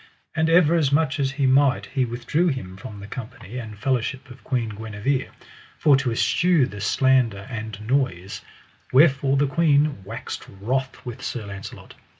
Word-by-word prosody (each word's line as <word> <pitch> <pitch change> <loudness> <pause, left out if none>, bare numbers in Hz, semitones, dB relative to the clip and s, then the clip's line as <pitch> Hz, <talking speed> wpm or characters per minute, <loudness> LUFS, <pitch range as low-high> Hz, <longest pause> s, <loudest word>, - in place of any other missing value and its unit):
And 160 0 +2
ever 165 -1 +5
as 155 -5 +2
much 145 0 +2
as 135 -1 0
he 140 -1 0
might 135 +1 +3
he 135 -1 -1
withdrew 125 +9 0
him 110 - -3
from 100 +2 -9
the 100 - -8
company 115 +1 -8
and 110 -3 -8
fellowship 130 +2 -2
of 125 - -14
Queen 120 -4 -1
Guenever, 110 +5 -2 0.5
for 145 -3 +5
to 135 -3 -1
eschew 165 +5 +3
the 105 -5 -8
slander 120 -3 +2
and 110 -3 -5
noise; 115 -8 -1 0.5
wherefore 135 -1 +4
the 145 - +3
queen 145 - +2
waxed 110 +4 -7
wroth 130 +5 -2
with 120 -2 -7
Sir 115 -4 -4
Launcelot. 100 -1 -9
130 Hz, 160 wpm, -23 LUFS, 110-140 Hz, 0.5 s, ever